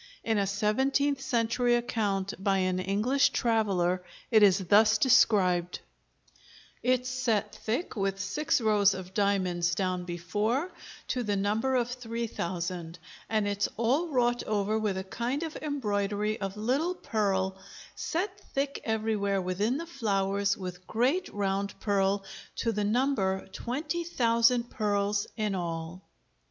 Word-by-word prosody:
In 220 Hz, -2 st, +1 dB
a 200 Hz, -, +1 dB
seventeenth 265 Hz, +8 st, +1 dB
century 240 Hz, -1 st, +1 dB
account 210 Hz, -5 st, -1 dB
by 195 Hz, -1 st, +2 dB
an 185 Hz, -1 st, 0 dB
English 210 Hz, +9 st, +2 dB
traveller 195 Hz, -6 st, +1 dB, 0.3 s
it 220 Hz, -2 st, +6 dB
is 195 Hz, -3 st, +6 dB
thus 210 Hz, +3 st, +4 dB
described: 185 Hz, -8 st, +3 dB, 1.0 s
Its 255 Hz, 0 st, +1 dB
set 250 Hz, -5 st, 0 dB
thick 240 Hz, +10 st, -3 dB
with 195 Hz, -2 st, -1 dB
six 265 Hz, +10 st, 0 dB
rows 210 Hz, -3 st, +3 dB
of 185 Hz, 0 st, -8 dB
diamonds 185 Hz, -4 st, +1 dB
downe 185 Hz, -1 st, -1 dB
before, 205 Hz, -, -1 dB, 0.4 s
to 250 Hz, -, 0 dB
the 210 Hz, -3 st, -1 dB
number 215 Hz, +6 st, 0 dB
of 240 Hz, -2 st, +2 dB
three 235 Hz, -2 st, -4 dB
thousand, 175 Hz, -4 st, -4 dB, 0.3 s
and 215 Hz, -2 st, +1 dB
its 205 Hz, 0 st, 0 dB
all 260 Hz, +10 st, +2 dB
wrought 245 Hz, -5 st, +1 dB
over 215 Hz, +1 st, 0 dB
with 210 Hz, -3 st, -1 dB
a 190 Hz, -, -3 dB
kinde 240 Hz, +9 st, -3 dB
of 320 Hz, -2 st, -5 dB
embroidery 210 Hz, -7 st, -1 dB
of 195 Hz, +1 st, -4 dB
little 275 Hz, +11 st, 0 dB
pearle 195 Hz, -, 0 dB, 0.4 s
set 385 Hz, +4 st, -3 dB
thick 280 Hz, +1 st, -1 dB
everywhere 215 Hz, -3 st, 0 dB
within 195 Hz, +7 st, 0 dB
the 335 Hz, -, -5 dB
flowers 200 Hz, -, 0 dB
with 180 Hz, -1 st, -7 dB
great 265 Hz, +11 st, +1 dB
round 200 Hz, 0 st, -2 dB
pearle, 200 Hz, -1 st, +1 dB, 0.3 s
to 230 Hz, -, 0 dB
the 210 Hz, -1 st, -1 dB
number 205 Hz, -4 st, +1 dB
twenty 295 Hz, -, -3 dB
thousand 235 Hz, -5 st, +2 dB
pearles 205 Hz, -2 st, 0 dB
in 210 Hz, -2 st, 0 dB
all. 170 Hz, 0 st, -4 dB
210 Hz, 135 wpm, -29 LUFS, 195-245 Hz, 1.0 s, it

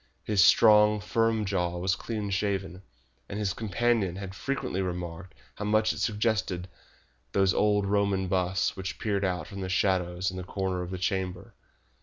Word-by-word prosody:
His 105 Hz, -3 st, +3 dB
strong, 105 Hz, -1 st, +6 dB
firm 110 Hz, +1 st, +1 dB
jaw 90 Hz, -3 st, -1 dB
was 95 Hz, +2 st, 0 dB
clean 105 Hz, -3 st, -4 dB
shaven, 95 Hz, -2 st, -2 dB, 0.5 s
and 100 Hz, -, -5 dB
his 100 Hz, -3 st, -1 dB
companion 110 Hz, -2 st, 0 dB
had 95 Hz, -1 st, -6 dB
frequently 100 Hz, -2 st, -3 dB
remarked 90 Hz, 0 st, -5 dB, 0.2 s
how 105 Hz, -, -4 dB
much 110 Hz, +1 st, +2 dB
it -, -, -7 dB
suggested 105 Hz, -5 st, 0 dB, 0.7 s
those 95 Hz, -2 st, +3 dB
old 105 Hz, -1 st, +2 dB
Roman 100 Hz, -1 st, +1 dB
busts 90 Hz, +1 st, 0 dB
which 95 Hz, -1 st, -5 dB
peered 100 Hz, -2 st, -1 dB
out 90 Hz, -2 st, -1 dB
from 100 Hz, -2 st, -8 dB
the 95 Hz, -, -3 dB
shadows 90 Hz, -1 st, +1 dB
in 95 Hz, -, -7 dB
the 90 Hz, -, -4 dB
corners 95 Hz, -1 st, -2 dB
of 90 Hz, -, -9 dB
his 90 Hz, -1 st, -5 dB
chamber. 95 Hz, -2 st, -2 dB
95 Hz, 165 wpm, -28 LUFS, 90-105 Hz, 0.7 s, strong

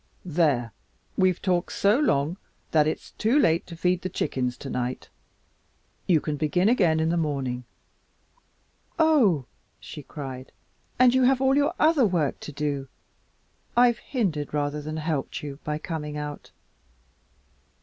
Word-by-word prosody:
There, 145 Hz, -9 st, +1 dB, 0.4 s
we've 185 Hz, -2 st, +2 dB
talked 180 Hz, -2 st, 0 dB
so 205 Hz, +6 st, +3 dB
long 155 Hz, -, +1 dB, 0.3 s
that 155 Hz, -1 st, +4 dB
it's 155 Hz, -, -4 dB
too 225 Hz, +6 st, +3 dB
late 170 Hz, -, +3 dB
to 170 Hz, -, -8 dB
feed 180 Hz, +1 st, +1 dB
the 185 Hz, -, -3 dB
chickens 130 Hz, -7 st, -2 dB
tonight. 125 Hz, -2 st, -4 dB, 1.0 s
You 170 Hz, -4 st, +4 dB
can 150 Hz, 0 st, -3 dB
begin 175 Hz, +7 st, +2 dB
in 160 Hz, -8 st, +2 dB
the 170 Hz, -, +1 dB
morning." 135 Hz, -6 st, -2 dB, 1.3 s
"Oh!" 260 Hz, -, +4 dB, 0.3 s
she 150 Hz, -, -9 dB
cried, 135 Hz, -2 st, -8 dB, 0.4 s
"and 250 Hz, -1 st, +6 dB
you 260 Hz, -, +3 dB
have 260 Hz, 0 st, +4 dB
all 265 Hz, 0 st, +3 dB
your 285 Hz, +1 st, +2 dB
other 305 Hz, -6 st, +4 dB
work 165 Hz, -7 st, 0 dB
to -, -, -8 dB
do. 145 Hz, -1 st, -3 dB, 0.9 s
I've 240 Hz, -1 st, +5 dB
hindered 170 Hz, -, -2 dB
rather 145 Hz, 0 st, -1 dB
than 155 Hz, +1 st, -5 dB
helped 155 Hz, -2 st, -3 dB
you 140 Hz, -1 st, -7 dB
by 150 Hz, 0 st, -2 dB
coming 150 Hz, -2 st, -5 dB
out." 150 Hz, 0 st, -6 dB
160 Hz, 140 wpm, -26 LUFS, 145-195 Hz, 1.3 s, and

